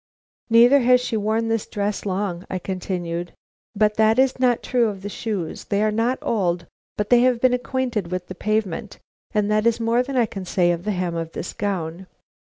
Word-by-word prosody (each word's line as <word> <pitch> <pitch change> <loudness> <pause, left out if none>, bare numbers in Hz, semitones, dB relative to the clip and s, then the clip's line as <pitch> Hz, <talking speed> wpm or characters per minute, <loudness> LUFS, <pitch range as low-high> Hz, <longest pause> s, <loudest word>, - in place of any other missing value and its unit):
"Neither 240 +4 +7
has 250 0 +5
she 245 -2 -3
worn 220 +2 0
this 225 -2 -1
dress 205 0 -3
long," 185 -2 -2
I 185 - -2
continued; 175 -2 -4 0.4
"but 210 0 +2
that 220 +1 +4
is 260 0 +2
not 250 -2 +2
true 245 -2 +2
of 195 -3 -5
the 205 - -4
shoes. 205 -6 -4
They 205 0 0
are 215 - +2
not 230 +4 +1
old, 180 -6 0 0.3
but 210 +2 -2
they 245 - +7
have 250 -1 +3
been 255 +1 +3
acquainted 250 -6 -2
with 180 0 -3
the 185 - -8
pavement, 210 0 -2 0.3
and 210 0 +1
that 215 +2 +2
is 235 0 +2
more 230 +1 +2
than 270 +2 -4
can 200 -2 -7
be 185 - -9
said 175 -1 +2
of 170 +2 -3
the 210 - 0
hem 180 -3 -2
of 165 -1 -4
this - - -5
gown. 185 -3 -3
210 Hz, 205 wpm, -22 LUFS, 185-235 Hz, 0.4 s, Neither